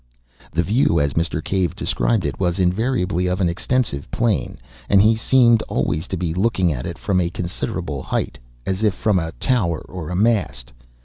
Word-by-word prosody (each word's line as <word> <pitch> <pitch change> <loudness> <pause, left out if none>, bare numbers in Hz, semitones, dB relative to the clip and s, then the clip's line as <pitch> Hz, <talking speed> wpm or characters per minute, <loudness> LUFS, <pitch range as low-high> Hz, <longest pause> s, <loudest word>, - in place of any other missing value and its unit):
The 85 +4 +1
view, 105 -5 +2
as 70 -1 0
Mr. 80 -2 -1
Cave 95 -4 -1
described 110 -5 0
it, - - -3
was 90 -2 0
invariably 90 -1 0
of 90 +1 -1
an 90 - +2
extensive 85 - -1
plain, 115 -4 -1 0.3
and 100 - +5
he 110 +3 +5
seemed 120 0 +4
always 80 +5 -1
to 95 - -3
be 85 -2 -2
looking 95 -3 +1
at 60 -2 -5
it - - -6
from 95 -2 0
a 85 - 0
considerable 85 0 -4
height, - - -3 0.3
as 95 +1 -2
if 105 -4 +2
from 105 -4 +1
a 80 -1 -3
tower 95 -11 0
or 85 -4 -7
a 90 - -3
mast. 95 - 0
90 Hz, 185 wpm, -21 LUFS, 85-110 Hz, 0.3 s, and